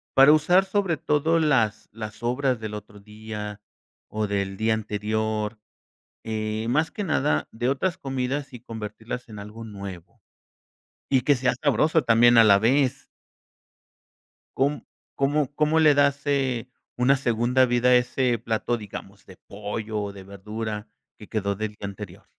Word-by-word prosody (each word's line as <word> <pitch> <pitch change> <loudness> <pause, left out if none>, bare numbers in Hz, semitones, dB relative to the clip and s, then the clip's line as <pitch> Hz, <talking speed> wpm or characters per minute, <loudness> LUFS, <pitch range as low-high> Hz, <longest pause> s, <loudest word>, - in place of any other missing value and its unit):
para 135 +2 +8
usar 175 +5 +4
sobre 190 -4 0
todo 155 +4 +1
las 115 -9 +1
las 110 0 -7
sobras 125 +1 -1
del 110 -1 -6
otro 105 0 -9
día 105 0 -8 0.5
o 110 0 -2
del 100 -1 -2
día 110 +1 +2
anterior? 110 0 -2 0.7
Eh, 110 0 -3
más 155 +6 +1
que 205 +4 -4
nada 150 -3 +1
de 120 +2 -2
otras 175 +7 0
comidas 135 0 -3
y 125 - -8
convertirlas 110 +2 -7
en 105 -2 -9
algo 105 +3 -9
nuevo 100 -5 -9 0.9
y 130 -2 +3
que 140 +3 +3
sea 125 0 +1
sabroso 150 +3 +3
también 120 +1 +5
a 115 - +9
la 100 -2 +6
vez. 130 +4 +1 1.5
¿Com 140 +3 +1 0.4
cómo 145 0 0
cómo 155 +2 +2
le 150 -2 +6
das, 140 0 +2
eh, 130 -4 0 0.3
una 130 +3 +4
segunda 125 +1 +2
vida 120 +1 +2
a - - +7
ese 125 0 +1
plato, 115 +2 -1
digamos, 100 -1 -10
de 95 - -14
pollo 105 +1 -4
o 100 -1 -4
de 95 -1 -10
verdura 105 +2 -6 0.3
que 105 - -12
quedó 100 -2 -1
del 110 0 -4
día 105 - -12
anterior? 100 -2 -9
115 Hz, 155 wpm, -25 LUFS, 105-135 Hz, 1.5 s, a